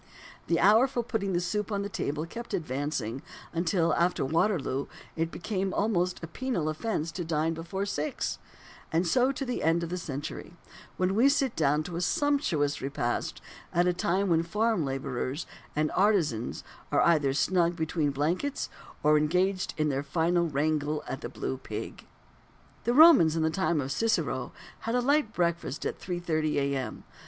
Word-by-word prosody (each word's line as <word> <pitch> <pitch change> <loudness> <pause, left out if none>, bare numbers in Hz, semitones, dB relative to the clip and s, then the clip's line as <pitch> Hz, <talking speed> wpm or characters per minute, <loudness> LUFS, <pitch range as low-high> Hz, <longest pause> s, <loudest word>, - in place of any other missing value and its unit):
The 170 -1 +2
hour 220 +6 +6
for 245 -2 -2
putting 205 -5 -2
the 175 - +2
soup 210 +4 -2
on 200 -1 -1
the - - -2
table 150 -5 -3
kept 235 +8 -5
on - - +1
advancing, 135 -5 -3 0.3
until, 170 0 +1
after 170 -4 +1
Waterloo, 155 -3 0 0.3
it 165 0 0
became 190 +1 -3
almost 180 -5 0
a - - -4
penal 175 -5 -2
offence 160 0 -2
to 175 - -4
dine 160 0 0
before 170 +5 -4
six; 155 -6 -2 0.5
and 165 +3 +2
so 250 +9 +3
to 275 0 -4
the 250 - -2
end 165 +2 +2
of 170 - -3
the 180 +1 -3
century, 145 +1 -6 0.4
when 185 +1 +1
we 240 +7 +5
sit 275 -4 +1
down 150 0 +2
to 170 +1 -5
a - - -2
sumptuous 235 - +1
repast 120 -3 -2 0.3
at 175 +1 +3
a 180 - +3
time 185 +3 0
when 165 -1 +4
farm 210 +2 +1
labourers 135 +2 -3 0.3
and 155 0 +1
artisans 170 - +1 0.3
are - - +3
either 150 -5 +4
snug 170 +5 +2
between 160 -1 0
the 140 - -1
blankets, 175 - -1 0.3
or 150 0 +5
engaged 185 +5 +1
in 155 -1 +1
their 135 -1 0
final 170 +4 +1
wrangle 150 0 0
at - - -4
the - - -5
"Blue 65 - -4
Pig." - - -7 0.8
The 240 +1 +2
Romans 280 - +8
in 165 - +1
the 160 - +2
time 170 -2 +1
of 135 -1 -2
Cicero 155 - 0 0.3
had 230 +1 -2
a - - +3
light 275 -2 +2
breakfast 170 - -1
at - - -3
3.30 165 -4 -1
A.M. 140 -2 -1
170 Hz, 175 wpm, -28 LUFS, 150-200 Hz, 0.8 s, Romans